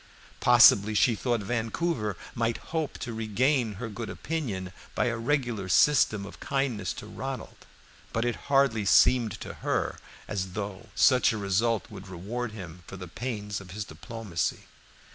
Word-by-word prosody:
Possibly 110 -3 +7
she 120 +3 +4
thought 120 +1 0
Vancouver 115 - -1 0.2
might 115 0 0 0.2
hope 160 -3 -1
to 120 - -5
regain 115 +2 +1
her 115 +4 -5
good 115 +1 -6
opinion 105 - -4 0.2
by - - +2
a 120 -1 0
regular 120 -5 -1
system 110 0 +4
of 100 - -11
kindness 135 -6 -1
to - - -8
Ronald; 130 +3 -7 0.4
but 115 +1 0
it 120 - 0
hardly 135 -6 +3
seemed 115 +1 +4
to - - -6
her - - -1 0.3
as 95 -3 -3
though 100 +1 -5
such 130 +5 +5
a - - -3
result 105 +3 0
would 95 - -9
reward 105 +7 -4
him 90 -5 -9
for 95 - -8
the 90 0 -7
pains 105 0 -4
of 95 - -13
his 100 +3 -5
diplomacy. 95 +2 -3
110 Hz, 155 wpm, -28 LUFS, 100-125 Hz, 0.4 s, Possibly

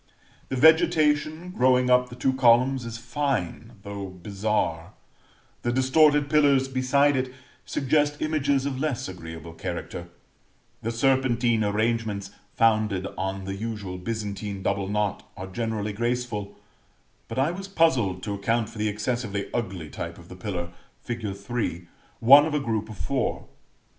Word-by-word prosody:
The - - -2
vegetation 160 +2 +3
growing 125 -4 +3
up 125 0 +4
the 120 - -9
two 130 +1 +1
columns 125 0 +4
is 115 0 -5
fine, 120 - -2
though 100 -1 -5
bizarre; 95 -2 -2 0.7
the 120 - 0
distorted 145 +3 +4
pillars 140 -3 +4
beside 135 +2 +2
it 130 -1 -1 0.4
suggest 145 +2 +1
images 140 -3 +1
of 135 -2 -2
less 145 -4 -1
agreeable 80 -2 -8
character; - - -5 0.7
the 115 - -2
serpentine 120 -2 +2
arrangements 105 -1 -1 0.2
founded 110 -4 +2
on 95 +1 -3
the 95 - -3
usual 100 -3 -5
Byzantine 100 -1 -4
double 100 -1 0
knot 105 -1 -1 0.2
are 95 - -5
generally 105 +1 -3
graceful; 120 -2 -2 0.7
but - - -7
I 135 +5 +2
was 195 +2 -6
puzzled 130 - +2
to 100 - -3
account 110 +3 0
for 115 - -10
the 105 0 +1
excessively 105 -1 -2
ugly 95 -9 -3
type 85 0 -6
of 85 -1 -15
the 90 - -9
pillar, 90 -2 -4 0.3
fig. 110 -5 -4
3, 100 -5 -3 0.3
one 140 +6 +8
of 155 - -2
a - - +2
group 110 -4 -2
of 110 - -9
four. 80 - -2
115 Hz, 145 wpm, -26 LUFS, 100-130 Hz, 0.7 s, one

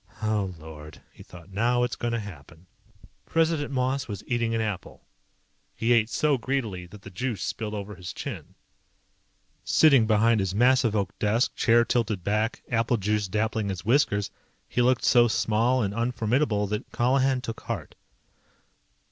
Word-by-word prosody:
Oh, 105 -4 -1
Lord, 75 -1 -11
he - - -15
thought. 90 +2 -14
Now 120 +5 +1
it's 125 - -1
going 120 0 -3
to 115 - 0
happen. 85 -4 -11 0.6
President 160 -3 +1
Moss 130 0 -1
was 100 -3 -6
eating 120 -2 0
an - - 0
apple. 105 -5 -5 0.7
He 115 +2 +2
ate 115 -1 +3
so 145 +1 +1
greedily 110 -9 -3
that 100 +2 -14
the 95 - -10
juice 110 +1 -3
spilled 110 -1 -4
over 105 0 -6
his 90 -2 -7
chin. - - -7 1.1
Sitting 140 -8 +5
behind 110 +1 +3
his 95 -1 -1
massive 120 -1 +3
oak 100 -1 -1
desk, 110 +3 +1
chair 115 0 +4
tilted 110 -6 -1
back, 105 +4 -1
apple 115 0 +1
juice 105 0 0
dappling 110 +1 -1
his 95 0 -5
whiskers, 110 -5 +2 0.4
he 125 - 0
looked 125 0 +2
so 120 -1 +5
small 115 +3 +1
and 100 -1 -2
unformidable, 115 -1 0
that 105 0 -4
Colihan 130 +2 +2
took 115 -3 -6
heart. - - -5
110 Hz, 155 wpm, -26 LUFS, 100-125 Hz, 1.1 s, Sitting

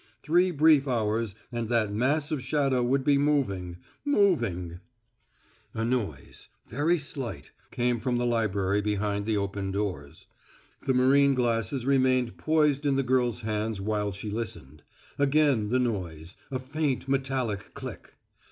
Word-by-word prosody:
Three 175 +4 +3
brief 155 -3 +4
hours 110 -3 0 0.2
and 120 -2 -3
that 110 -4 +1
mass 145 +7 +1
of 150 -4 -1
shadow 135 -1 +1
would 130 +2 +1
be 140 0 +3
moving 100 -12 0 0.3
moving 115 - +1 1.0
A 115 0 -1
noise, 115 - -3 0.2
very 150 +8 +1
slight, 140 -5 -6 0.2
came 120 -1 0
from 120 +2 -1
the 120 - 0
library 105 -4 +1
behind 105 0 -1
the 110 -2 +1
opened 100 -1 -3
doors. 95 -9 -4 0.6
The 130 - +3
marine 135 +2 +4
glasses 120 0 0
remained 130 -3 +2
poised 150 -2 +2
in 140 - +2
the 135 - +1
girl's 125 -2 +1
hands 110 -1 -2
while 105 0 -1
she 100 +2 -6
listened. 105 - -6 0.4
Again 140 -6 +3
the 125 - +2
noise 90 -9 -3
a 130 - -2
faint 135 +1 -2
metallic 130 -6 -2
click. - - -9
120 Hz, 140 wpm, -27 LUFS, 105-140 Hz, 1.0 s, brief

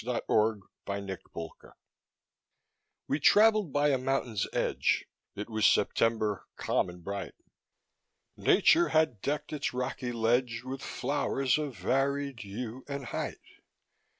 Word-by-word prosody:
NATURE'S 110 -3 +1 0.2
LESSON 95 -4 -6 1.4
We - - 0
traveled 210 +1 +5
by 145 +2 +3
a 135 -2 +2
mountain's 130 -5 -1
edge, - - +1 0.3
It 105 - -5
was 110 -2 -2
September 110 -5 +1
calm - - 0
and 90 -1 -11
bright, 100 +1 -5 1.0
Nature 345 +2 +4
had 155 -10 +2
decked 150 +2 -2
its 140 -4 -2
rocky 125 -1 -2
ledge 115 0 +1
With 130 +1 -5
flowers 135 -2 0
of 145 -7 -4
varied 135 +6 0
hue 115 +5 -6
and 140 -2 -5
height. - - -4
125 Hz, 115 wpm, -30 LUFS, 110-140 Hz, 1.4 s, traveled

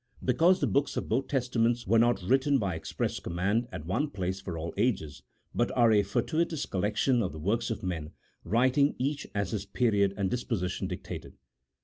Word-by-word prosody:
Because 165 +9 +4
the - - +3
books 140 +1 0
of - - -2
both 130 +5 0
Testaments 120 -3 +1
were 115 +4 +4
not 120 -4 +3
written 135 +7 +3
by 100 -7 -1
express 80 0 -3
command 100 +7 -1
at 85 -4 -7
one 120 - 0
place 95 -4 -3
for 85 -3 -5
all 80 +1 -4
ages, 100 - -1 0.3
but 120 - +1
are 120 -2 +6
a 105 -1 +5
for 100 0 0
tuitous 160 -2 -1
collection 105 +6 +1
of 95 - -2
the - - -7
works 110 +10 0
of 115 -1 -4
men, 85 -5 -3 0.3
writing 130 - +3
each 140 +3 -2
as 100 -2 -1
his 105 -3 -3
period 100 -5 +2
and 100 -2 0
disposition 95 -6 -2
dictated. 90 -1 -7
110 Hz, 190 wpm, -29 LUFS, 95-125 Hz, 0.3 s, are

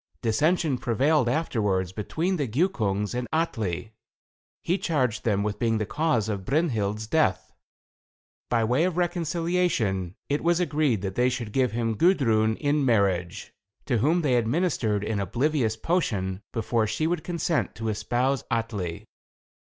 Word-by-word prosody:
Dissension 145 +4 +1
prevailed 135 +2 +2
afterwards 105 - 0
between 160 - -2
the 145 -4 -1
Giukungs 110 - 0
and 125 0 -3
Atli. 115 - -2 0.7
He 180 +3 0
charged 130 -9 0
them 100 -3 +1
with 105 -1 -3
being 115 -1 +1
the 110 - -1
cause 145 -4 0
of 100 -3 -3
Brynhild's 110 - 0
death. 110 - 0 1.0
By 115 -2 +2
way 125 +8 +2
of 180 -2 -2
reconciliation, 170 - 0
it 145 +1 -1
was 170 +1 +3
agreed 150 - +1
that 95 -1 -2
they 125 +4 +2
should 120 -4 -4
give 130 -4 +1
him 115 -1 0
Gudrun 115 - +3
in 145 +2 0
marriage, 100 -8 0 0.3
to 125 -5 +1
whom 160 +9 +2
they 130 -4 +3
administered 115 - 0
an 105 -1 -1
oblivious 115 - 0
potion, 105 - -1
before 115 0 0
she 155 +9 -1
would 165 -1 -1
consent 170 -2 -1
to 110 0 -4
espouse 125 +4 0
Atli. 105 -7 -3
120 Hz, 145 wpm, -26 LUFS, 105-155 Hz, 1.0 s, was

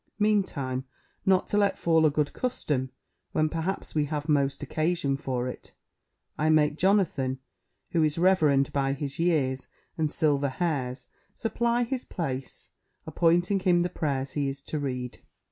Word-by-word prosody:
Meantime, 185 -12 0 0.4
not 190 -1 +4
to 205 - +1
let 200 -1 +2
fall 160 -1 +4
a - - +4
good 150 0 -1
custom, 145 - -2 0.4
when 155 - +2
perhaps 165 +4 -3
we 150 -1 +1
have 150 0 -4
most 140 -2 +1
occasion 155 -3 0
for 130 -3 -2
it, 125 - -8 0.7
I 155 +1 +2
make 150 -1 +4
Jonathan, 165 -8 +1 0.5
who 165 - +2
is 155 0 +1
reverend 155 -7 +3
by 135 -1 +1
his 140 +2 -4
years 140 -7 +1 0.3
and 155 -1 +2
silver 145 -3 +1
hairs, 130 -5 -2 0.3
supply 235 +2 0
his 250 +1 -3
place, 135 -7 -5 0.3
appointing 175 +5 +2
him 180 -2 +3
the 175 - 0
prayers 140 -5 -2
he 145 -1 -1
is 135 0 -7
to 155 - -3
read. 125 -3 -4
155 Hz, 150 wpm, -27 LUFS, 135-175 Hz, 0.7 s, not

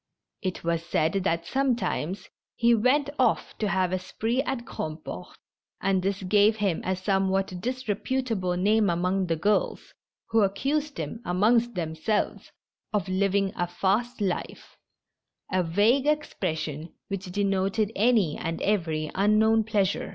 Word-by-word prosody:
It 185 -3 -3
was 165 0 0
said 160 -1 +1
that 170 -2 0
sometimes 235 - -1 0.3
he 235 0 +4
went 265 +6 +2
off 255 - +1
to 215 - 0
have 185 -1 +1
a 185 - 0
spree 225 +7 -1
at 270 -4 -3
Grandport, 155 - -6 0.4
and 195 -1 +1
this 195 +1 -2
gave 205 +3 +4
him 200 -6 0
a 185 - 0
somewhat 190 -1 0
disreputable 230 -4 -1
name 210 +2 +3
among 180 +2 0
the 165 - +1
girls, 205 +6 0 0.4
who 225 0 +4
accused 280 +10 0
him, 230 - -5
amongst 225 +6 +2
themselves, 165 +5 -2 0.4
of 205 -5 -1
living 195 +1 +1
a 175 - -1
fast 210 +7 0
life 190 -3 -3 0.4
— - - -31
a 185 -1 +2
vague 210 - +2
expression 165 - -2
which 195 -1 -4
denoted 195 +2 0
any 210 -7 +3
and 165 0 -3
every 160 -7 0
unknown 220 +3 +3
pleasure. 205 -3 0
195 Hz, 135 wpm, -26 LUFS, 180-225 Hz, 0.4 s, he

